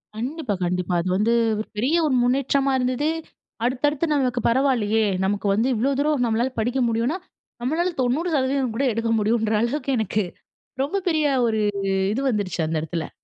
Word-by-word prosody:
கண்டிப்பா, 255 0 -3
கண்டிப்பா. 180 0 -1
அது 185 - -3
வந்து 225 +3 +2 0.3
ஒரு 220 - -4
பெரிய 260 +10 +1
ஒரு 275 -4 +2
முன்னேற்றமா 275 +2 +1
இருந்தது, 255 +4 0 0.6
அடுத்தடுத்து 290 +5 +1
நமக்கு 250 -4 0
பரவாயில்லையே, 230 -4 +2 0.2
நமக்கு 200 +1 -1
வந்து 225 +5 +1
இவ்வளோ 250 +6 +1
தூரம் 290 -3 +1
நம்மளால 235 +3 0
படிக்க 245 +4 0
முடியும்னா, 235 +9 0 0.4
நம்மளால 330 +8 0
90% 265 -2 0
கூட 270 - 0
எடுக்க 230 +1 -1
முடியும்ன்ற 220 +1 +1
அளவுக்கு 275 +4 -1
எனக்கு 215 -1 0 0.6
ரொம்ப 300 +8 -1
பெரிய 310 -2 +1 0.2
ஒரு 220 -1 0 0.5
இது 260 - -2
வந்துருச்சு 195 -5 -1
அந்த 160 -1 -1
இடத்துல. 160 0 -4
245 Hz, 150 wpm, -23 LUFS, 220-275 Hz, 0.6 s, வந்து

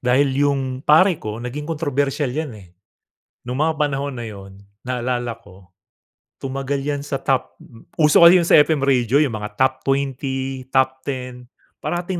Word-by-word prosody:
Dahil 130 +3 +2 0.2
yung 135 -1 -1
"Pare 170 +3 +5
Ko" 110 -2 -6
naging 125 +5 -5
kontrobersyal 145 -3 -1
'yan, 150 -1 -3
eh. 95 -4 -15 0.8
Nung 125 +3 -3
mga 160 -1 0
panahon 140 -1 -1
na 120 - -5
yun 100 -2 -10 0.3
naalala 125 -1 -2
ko 95 -2 -18 0.7
tumagal 135 +1 -3
'yan 145 0 -2
sa 135 -2 -3
top, 135 -2 -1
mm, 115 -2 -18
uso 150 -2 +5
kasi 170 +2 +9
yung - - -1
sa - - +7
FM 150 -1 +2
radio 130 -3 +2
yung 135 - -2
mga 105 0 -7
top 130 +2 +2
20, 135 -1 -2
top 130 0 +1
10, 125 -2 -6 0.3
parating 175 +1 -3
135 Hz, 160 wpm, -21 LUFS, 125-145 Hz, 0.8 s, kasi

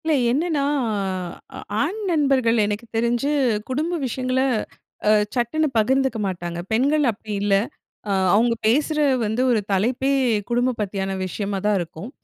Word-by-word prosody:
இல்ல. 320 - +2 0.2
என்னன்னா 305 +2 0 1.2
ஆண் 355 +10 -1
நண்பர்கள் 270 -7 +2
எனக்கு 210 +3 -3
தெரிஞ்சு 235 +4 +1 0.4
குடும்ப 315 +7 -1
விஷயங்கள 255 +1 -1 0.9
சட்டுன்னு 255 +6 +1
பகிர்ந்துக்க 265 +3 +2
மாட்டாங்க. 175 -2 -4
பெண்கள் 280 +7 +2
அப்படி 215 0 -10
இல்ல, 205 -1 +2 0.6
அ - - +1 0.2
அவங்க 230 +2 +3
பேசுற 300 +6 +2 0.3
வந்து, 220 +4 -1
ஒரு 230 - +3
தலைப்பே 245 +8 +1 0.4
குடும்பம் 245 0 0
பத்தியான 195 -1 -2
விஷயமா 200 +2 -3
தான் 210 -1 +3
இருக்கும். 175 +5 -6
240 Hz, 125 wpm, -22 LUFS, 210-275 Hz, 1.2 s, அவங்க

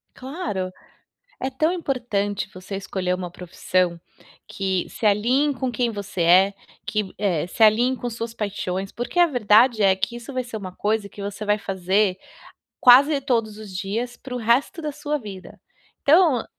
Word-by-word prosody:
Claro. 255 - -4 0.7
É 265 - -2
tão 310 +6 0
importante 230 - -2
você 185 +2 -7
escolher 185 -2 -2
uma 180 -2 -6
profissão 180 -1 -1 0.5
que 190 -2 -2
se 220 - -6
alinhe 250 +8 +2
com 255 0 -2
quem 240 0 0
você 200 -4 -5
é, 185 +4 +5 0.3
que, 210 -3 -2
eh, 180 -6 0
se 220 - +1
alinhe 235 +4 +4
com 245 - -4
suas 230 0 -5
paixões, 195 -3 -3
porque 240 +9 -3
a 350 - +8
verdade 235 -4 +4
é 190 -1 +5
que 195 +5 -3
isso 240 +3 -8
vai 255 -1 -1
ser 230 -2 -6
uma 190 -3 -7
coisa 210 -1 -1
que 200 - -11
você 200 +1 -5
vai 210 0 +2
fazer 190 0 0 0.6
quase 275 +4 +7
todos 225 -5 0
os 210 -3 -10
dias, 220 +6 -3
pro 255 -1 -7
resto 245 +8 +1
da 300 -1 -3
sua 295 +1 -3
vida. 200 -6 -10 0.4
Então, 305 -5 +4
215 Hz, 165 wpm, -23 LUFS, 195-250 Hz, 0.7 s, a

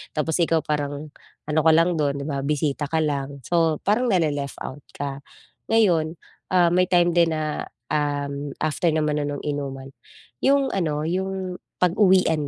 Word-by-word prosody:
tapos 160 +3 0
ikaw 165 -1 +3
parang 145 0 -3 0.3
ano 155 +1 +1
ka 160 - +6
lang 170 +1 +3
dun 140 -2 +1
di 140 - -4
ba 140 -2 -2
bisita 145 0 -1
ka 160 - +1
lang, 140 -1 -3
so 165 -3 +2
parang 220 +5 +2
na-le-left 145 -6 0
out 140 +2 -7
ka. 140 -1 -4 0.5
Ngayon, 175 -8 +3 0.4
ah, 175 -2 +4
may 180 0 +3
time 175 -1 +4
din 170 -1 +4
na 155 -1 -3 0.3
um 145 -1 -2
after 155 +2 +1
naman 150 -1 0
na - - -1
nung 145 -1 -5
inuman, 135 -2 -4 0.5
yung 275 0 +3
ano 155 -5 -1
yung 190 +1 -3 0.2
pag-uwian 180 -4 +3
155 Hz, 160 wpm, -23 LUFS, 145-175 Hz, 0.5 s, ka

